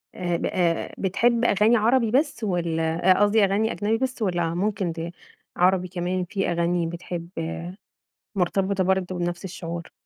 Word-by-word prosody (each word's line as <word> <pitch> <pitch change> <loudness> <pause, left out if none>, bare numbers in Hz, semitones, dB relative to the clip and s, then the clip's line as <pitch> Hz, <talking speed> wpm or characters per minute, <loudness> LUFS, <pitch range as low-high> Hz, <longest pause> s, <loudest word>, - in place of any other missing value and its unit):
آآ، 175 -2 -1
ب - - -3
آآ، 170 -2 0
بتحب 235 +5 +2
أغاني 215 +3 +4
عربي 230 +1 +3
بس 280 -2 +1
والّا 170 -2 +1
أ 185 - +4
قصدي 205 +1 +4
أغاني 205 +3 +2
أجنبي 215 +2 0
بس 255 -1 -3
والّا 175 -4 0
ممكن 190 -1 -1
دى 165 +1 -5 0.5
عربي 185 0 +3
كمان 180 +1 -2
في 195 -1 -2
أغاني 170 0 0
بتحب 170 0 -6 1.1
مرتبطة 190 +1 +1
برضو 185 -1 0
بنفس 175 +1 -3
الشعور؟ 170 -2 -6
185 Hz, 150 wpm, -24 LUFS, 175-210 Hz, 1.1 s, أغاني